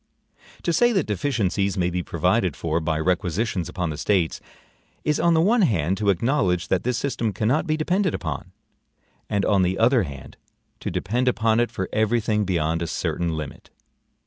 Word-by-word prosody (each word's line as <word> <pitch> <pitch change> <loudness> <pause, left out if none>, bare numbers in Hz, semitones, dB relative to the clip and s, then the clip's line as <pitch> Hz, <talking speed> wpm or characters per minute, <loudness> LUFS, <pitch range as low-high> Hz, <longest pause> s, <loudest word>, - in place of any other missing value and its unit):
To 170 - +1
say 240 +9 +4
that 190 - +1
deficiencies 100 -4 0
may 90 -1 +1
be 90 +1 -1
provided - - 0
for 80 0 -1
by 80 -1 -1
requisitions 90 +2 -1
upon 90 -3 -2
the 75 - -6
States, 90 -5 +1 0.6
is 150 -1 +1
on 170 -1 +3
the 160 - +4
one 220 +7 +3
hand 95 - +2
to 105 -2 +1
acknowledge 95 - +1
that 95 - +2
this 125 -1 -1
system 120 -5 -1
cannot 115 - 0
be 155 0 +1
depended 180 +3 +1
upon, 80 -5 -5 0.8
and 100 -1 0
on 100 -2 +3
the 90 +1 +1
other 120 +2 +4
hand 70 -7 -8 0.4
to - - -4
depend 105 +8 -1
upon 115 -2 +2
it 120 - +2
for 95 - -4
every 110 +2 +2
thing 105 -1 0
beyond 85 -3 0
a 85 - -2
certain 85 0 -2
limit. 75 -2 -7
100 Hz, 180 wpm, -23 LUFS, 85-125 Hz, 0.8 s, say